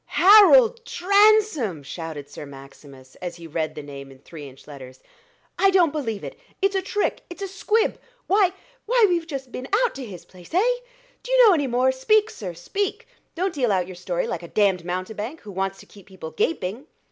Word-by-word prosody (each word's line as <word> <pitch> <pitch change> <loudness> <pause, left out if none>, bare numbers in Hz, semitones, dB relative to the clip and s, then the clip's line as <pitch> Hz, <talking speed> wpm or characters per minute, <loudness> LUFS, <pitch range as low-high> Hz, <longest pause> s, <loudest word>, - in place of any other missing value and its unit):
"Harold 445 +4 +7
Transome!" 400 - +2
shouted 155 -1 -7
Sir - - -10
Maximus, 135 -1 -14
as 175 -1 -6
he 170 -1 -12
read 160 0 -3
the 150 - -7
name 140 -1 -10
in 135 - -15
three 145 +1 -11
inch 135 0 -18
letters. 130 -3 -12 0.6
"I 390 - +5
don't 360 -5 +3
believe 230 -9 -4
it - - -8 0.2
it's 390 0 +1
a 385 - +1
trick 410 +2 -2
it's 350 +3 -8
a - - -3
squib: 425 +4 0 0.3
why 390 -1 +3 0.4
why 480 -1 +4
we've 340 -3 -1
just 270 -5 -6
been 255 +2 -6 0.3
to 270 - -7
his 180 -7 -10
place 180 - -12
eh? 460 +7 +3 0.5
do - - -8
you - - +6
know 410 - +7
any 290 -5 0
more? 255 +1 +2
Speak, 425 +12 +2
sir 180 -5 -7
speak; 390 - -4 0.3
don't 370 +1 -1
deal 250 -7 0
out 185 -2 +1
your 185 0 -10
story 175 0 -3
like 170 - -4
a 170 - -9
damned 195 -2 +1
mountebank, 205 - -5
who 210 - -10
wants 195 +1 -3
to - - -15
keep 200 -3 -17
people 185 -5 -9
gaping." 190 - -2
225 Hz, 195 wpm, -23 LUFS, -, 0.6 s, Harold